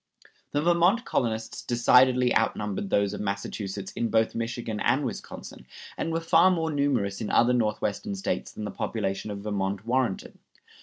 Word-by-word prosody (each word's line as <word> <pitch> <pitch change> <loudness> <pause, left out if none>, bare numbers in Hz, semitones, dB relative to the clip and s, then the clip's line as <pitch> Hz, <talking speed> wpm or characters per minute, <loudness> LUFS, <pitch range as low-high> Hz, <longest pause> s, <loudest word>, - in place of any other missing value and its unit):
The 145 +1 +1
Vermont 175 +7 +3
colonists 110 -2 -2
decidedly 125 +1 +4
outnumbered 105 -3 -1
those 100 0 +1
of - - -5
Massachusetts 100 -1 -4
in 115 - -2
both 110 0 +2
Michigan 115 -2 -3
and 140 +1 +1
Wisconsin, 120 - -7 0.3
and 165 - -3
were 165 - 0
far 165 +2 +5
more 165 -3 0
numerous 130 -10 0
in 110 - -3
other 120 +1 +4
Northwestern 120 - -1
States 195 - -3
than 110 - -7
the 105 - -4
population 95 +2 -3
of 100 -1 -6
Vermont 100 -1 -2
warranted. 120 -4 -1
115 Hz, 155 wpm, -27 LUFS, 105-140 Hz, 0.3 s, far